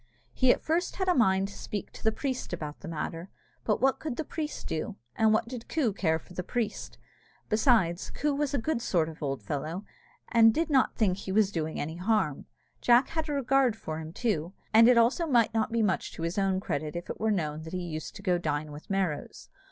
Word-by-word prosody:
He 255 -1 +4
at - - 0
first 335 +3 0
had 380 -1 -1
a 365 - +5
mind 195 - +3
to - - -11
speak 205 0 -5
to - - -13
the 220 - +3
priest 255 -3 -3
about 150 -3 -5
the 195 - -9
matter. 165 +2 -4 0.3
But 215 - +1
what 270 +1 +3
could 305 -6 -4
the 320 - -2
priest 305 0 -5
do, 155 - -3 0.2
and 220 -1 +4
what 220 +1 +2
did 240 -1 -8
Coo 265 -10 +1
care 160 -5 +1
for 170 - -14
the 180 - -3
priest? 220 +3 -3 0.5
Besides, 215 -6 +3
Coo 295 -1 -1
was 285 0 0
a - - +2
good 255 0 -1
sort 165 -7 +1
of 160 - -10
an - - -26
old 135 -6 -3
fellow, 155 - -4 0.5
and 225 -1 +7
did 325 -1 0
not 265 -2 +3
think 190 -5 +2
he 195 - -5
was 205 0 +3
doing 160 -4 -3
any 160 +3 -4
harm. 190 -6 0 0.3
Jack 245 +2 +5
had 320 -1 -2
a - - -1
regard 270 -3 +2
for 160 -7 -5
him, 160 0 -7
too, 185 -5 -1 0.2
and 225 +1 +8
it 250 - +6
also 250 +9 +3
might 235 -6 +3
not 225 0 0
be 230 -1 +2
much 190 -4 0
to 165 - -6
his 170 +4 -1
own 190 -1 +1
credit 155 -4 -3
if 175 - -5
it - - -6
were 220 - +1
known 155 -7 -1
that 160 +2 -9
he 180 -1 -2
used 155 -2 -6
to 195 - -10
go 180 -3 +2
dine 150 -2 -2
with 145 +1 -11
Merrows. 190 -7 -2
205 Hz, 235 wpm, -29 LUFS, 165-245 Hz, 0.5 s, and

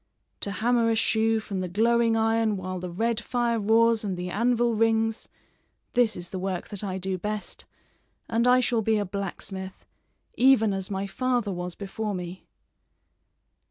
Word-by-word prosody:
To - - -3
hammer 230 +3 +2
a 225 - +2
shoe 220 +1 +2
from 200 -3 -5
the 185 - -2
glowing 230 +4 +2
iron 225 -1 +2
while 185 0 -4
the 180 0 -5
red 225 +6 0
fire 240 -1 0
roars 225 +1 +3
and 195 -3 -2
the 180 0 -4
anvil 235 +2 +2
rings 225 0 +1 0.6
this 240 -3 +3
is 175 -1 -7
the 185 - -4
work 185 -1 -3
that 205 0 -6
I 190 -2 -3
do 190 0 -3
best, 210 +2 -5 0.6
and 230 +1 +1
I 250 0 +6
shall 240 -2 +1
be 220 0 +2
a 205 - 0
blacksmith, 190 0 -6 0.5
even 235 -5 +4
as 190 -1 -3
my 195 0 -2
father 245 +1 -1
was 180 -1 -5
before 205 +1 -4
me." 180 +1 -7
215 Hz, 165 wpm, -26 LUFS, 190-230 Hz, 0.6 s, I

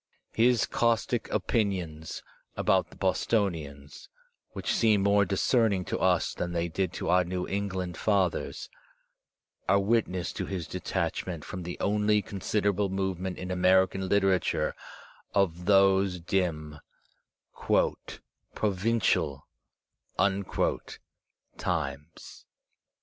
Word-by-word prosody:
His 120 0 +3
caustic 115 0 0
opinions 90 -8 -2 0.3
about - - +2
the - - -16
Bostonians, 75 -10 -2 0.4
which - - -3
seem 110 -3 +3
more 100 0 +4
discerning 100 0 +1
to - - -3
us - - +2
than 85 0 -4
they 85 0 -1
did 90 +1 -1
to - - -4
our 90 +1 +4
New 90 +1 -3
England 95 -3 -3
fathers, 95 -5 0 1.0
are 100 - +5
witness 100 -4 0
to - - -4
his 95 -4 -4
detachment 85 -5 -3
from 95 - -6
the 90 0 -6
only 105 0 +2
considerable 100 +1 -1
movement 95 -1 -2
in 90 0 -5
American 95 +1 +3
literature 95 -2 +2 0.6
of 90 -3 +1
those 95 -1 +4
dim 85 -5 -2 1.8
"provincial" 95 -8 0 2.1
times. 75 +4 -4
95 Hz, 100 wpm, -28 LUFS, 90-100 Hz, 2.1 s, are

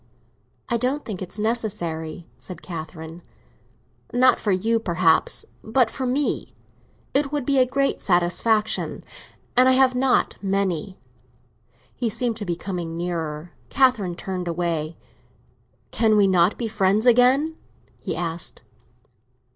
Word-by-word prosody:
"I 235 - +1
don't 260 +5 -1
think 200 -5 -5
it 185 - -5
is - - -6
necessary," 175 -8 -2
said 180 -3 -10
Catherine. 160 -1 -8 0.9
"Not 255 +1 +4
for 210 - 0
you, 225 +5 +1
perhaps, 170 -5 +1 0.2
but 225 +1 +2
for 260 -2 -3
me. 275 +4 -1 0.6
It 280 0 +2
would 290 -4 -2
be 275 0 +2
a 255 - +4
great 275 +2 0
satisfaction—and 195 +5 +1 0.6
I - - +5
have 260 0 +4
not 255 0 +1
many." 195 -2 -1 1.0
He 240 -2 -2
seemed 230 +1 -1
to 210 - -5
be 175 -2 -1
coming 175 -2 -5
nearer; 165 -2 -4 0.2
Catherine 225 -10 +2
turned 180 0 -5
away. 170 -2 -2 0.9
"Can 220 -2 +3
we 205 - +5
not 185 0 +3
be 235 - -2
friends 210 0 +1
again?" 255 +6 +4 0.4
he - - -4
said. 165 -1 -4
200 Hz, 130 wpm, -23 LUFS, 175-245 Hz, 1.0 s, I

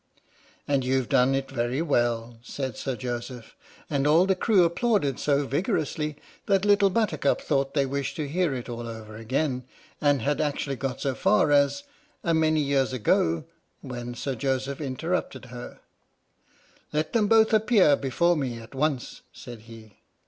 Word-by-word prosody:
"And 140 -2 +1
you've 130 -1 0
done 130 +2 +3
it 135 0 -3
very 120 +1 -1
well," 120 -6 0
said 130 0 -5
Sir 135 -2 -3
Joseph, 120 -1 -6 0.3
and 140 0 0
all 165 +5 +5
the 190 - +3
crew 195 -1 +3
applauded 170 - +1
so 145 -1 +1
vigorously 150 0 -1 0.3
that 195 -1 +2
Little 205 -1 +5
Buttercup 180 -9 +1
thought 135 -1 -1
they 140 -2 +3
wished 140 +1 -3
to 150 -2 -3
hear 175 +2 0
it 125 - -6
all 120 -1 -6
over 110 -2 -8
again, 130 +4 -1 0.4
and 145 -5 +2
had 145 +1 0
actually 145 -2 -2
got 135 -1 -3
so 135 - 0
far 190 +2 +2
as 145 - +3 0.4
"A 170 - +1
many 155 -1 +2
years 140 -2 +1
ago," 85 -8 +1 0.4
when 120 -1 -6
Sir 135 +2 -3
Joseph 135 +3 -2
interrupted 140 0 -3
her: 120 0 -9 0.5
" - - -34
Let 155 +1 -1
them 220 -3 +3
both 220 +1 +4
appear 215 -8 +5
before 170 +6 +1
me 130 -6 -2
at 115 +2 -12
once," 135 -2 -2
said 120 -2 -10
he. 110 -2 -14
140 Hz, 165 wpm, -26 LUFS, 125-160 Hz, 0.5 s, all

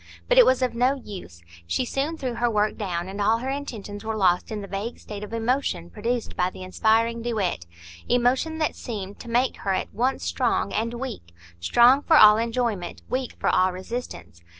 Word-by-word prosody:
But - - +5
it - - +8
was 260 0 +3
of 250 - 0
no 250 +3 +2
use; 185 - -10 0.2
she 170 - 0
soon 285 +6 -2
threw 255 -4 -3
her 235 +1 0
work 210 -1 +1
down, 175 -4 -3
and 195 +2 -5
all 220 +3 +3
her 260 +3 -3
intentions 220 -7 -6
were 220 0 -3
lost 180 0 +2
in 215 -1 -3
the - - -7
vague 200 +5 -4
state 210 -1 -8
of 210 - -8
emotion 230 -7 -1
produced 230 +2 -3
by 180 0 +1
the 185 - -10
inspiring 225 +5 +1
duet,—emotion 215 - -1
that 310 -1 0
seemed 205 -5 -6
to 235 - -9
make 245 +3 +1
her 195 -1 -1
at - - -4
once 255 +4 0
strong - - 0
and 230 +2 -1
weak; 235 - -7 0.2
strong 240 - +5
for 320 +1 +4
all 215 -3 +9
enjoyment, 230 -5 -2
weak 255 -1 -2
for - - +1
all 185 0 +3
resistance. 185 - -7
225 Hz, 195 wpm, -25 LUFS, 190-250 Hz, 0.2 s, all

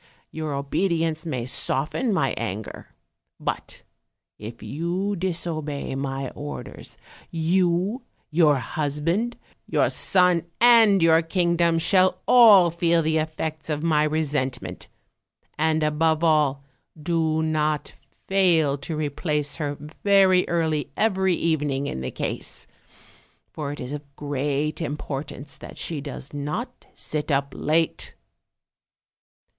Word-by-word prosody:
Your 155 -2 -4
obedience 160 +2 -1
may 125 -6 -2
soften 150 - 0
my 140 -9 +1
anger; 110 -2 -6 0.5
but - - -5 0.6
if 110 +1 -9
you 175 - -2
disobey 165 -6 -3
my 135 -1 -3
orders, 145 0 -8 0.3
you, 180 +6 +1 0.3
your 155 -2 +4
husband, 155 - -1 0.3
your - - +2
son 180 -2 +3
and 225 -6 +6
your 165 0 +5
kingdom, 170 0 +1
shall 185 +3 +3
all 205 -8 +7
feel 170 0 +2
the 160 0 +1
effects 155 0 -4
of 150 0 -2
my 155 -2 +3
re 155 +1 +1
sentment; 130 -10 -3 0.7
and 160 0 +1
above 155 +1 +1
all 150 -4 +2 0.4
do 160 0 0
not 155 -1 -1 0.3
fail 165 -7 +3
to 155 +3 -4
replace 150 0 -1
her 145 -3 -3 0.3
very 195 -2 +4
early 160 -4 0
every 190 -4 +2
evening 145 -4 0
in 65 - -4
the 65 - -3
case, - - -4 0.9
for 145 -2 -4
it 145 - -7
is 125 +3 -5
of 140 -1 -9
great 145 +1 -2
impor 150 -3 -4
tance 140 -1 -10
that - - -11
she 155 -4 -3
does 140 0 -8
not 155 - -5
sit 150 0 -3
up 140 0 0
late." 160 +2 0
155 Hz, 120 wpm, -24 LUFS, 145-170 Hz, 0.9 s, all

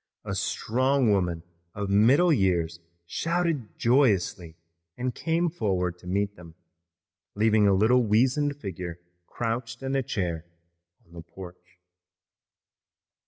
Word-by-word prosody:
A - - -3
strong 130 +1 +1
woman 90 -4 0 0.3
of 100 -1 -3
middle 130 - +5
years 85 - +1 0.3
shouted 165 - -2
joyously 100 - +1 0.4
and 125 0 -2
came 165 +5 0
forward 95 - -1
to 90 - -13
meet 100 +2 -1
them, 85 -3 -14 0.8
leaving 105 0 +3
a 100 - +4
little 115 +6 +4
weazened 130 +7 +1
figure 90 - -6 0.3
crouched 115 +1 -4
in 135 +1 -2
a 135 - +2
chair 90 -9 -3 0.6
on 85 - -22
the 85 - -8
porch. 90 +1 -13
105 Hz, 120 wpm, -26 LUFS, 90-130 Hz, 0.8 s, middle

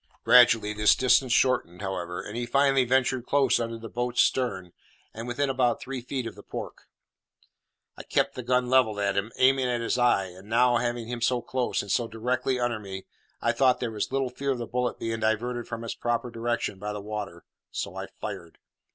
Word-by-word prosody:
Gradually 115 -4 +6
this 105 0 +4
distance 130 0 +3
shortened, 115 -9 +1
however, 90 -2 -4
and 105 - -8
he 120 0 -3
finally 135 0 +3
ventured 130 0 +1
close 140 -1 +3
under 115 -1 -3
the 115 0 -8
boat's 120 +2 -3
stern, 95 -9 -1 0.4
and 115 +2 -7
within 140 +4 0
about 130 -3 +1
three 130 -1 -5
feet 130 0 -4
of 115 - -5
the - - -13
pork. - - -8 1.1
I - - -8
kept - - 0
the 125 - -5
gun 125 +1 +1
levelled 125 -5 +3
at 100 -1 0
him, 100 +3 -1
aiming 130 0 +4
at 120 -1 0
his 115 +2 -1
eye; 120 -6 +3
and 95 +3 -13
now, 120 +1 +4
having 120 -1 -2
him 120 0 -5
so 125 +1 +2
close, 130 -5 -1
and 100 - -6
so 120 - +1
directly 125 +3 -1
under 120 -2 -1
me, 95 -2 -8 0.4
I 120 - +3
thought 125 +1 +3
there 120 -2 -2
was 105 +2 -3
little 135 -2 -1
fear 140 +2 -4
of 135 - +1
the 120 - -4
bullet 125 +1 -2
being 115 0 -3
diverted 115 +2 -1
from 115 0 -5
its 115 - -4
proper 120 0 -2
direction 115 -4 -2
by 105 +1 -4
the 105 - -5
water, 100 -5 -6 0.3
so - - -4
I - - -5
fired. 85 -1 -8
120 Hz, 205 wpm, -27 LUFS, 110-125 Hz, 1.1 s, Gradually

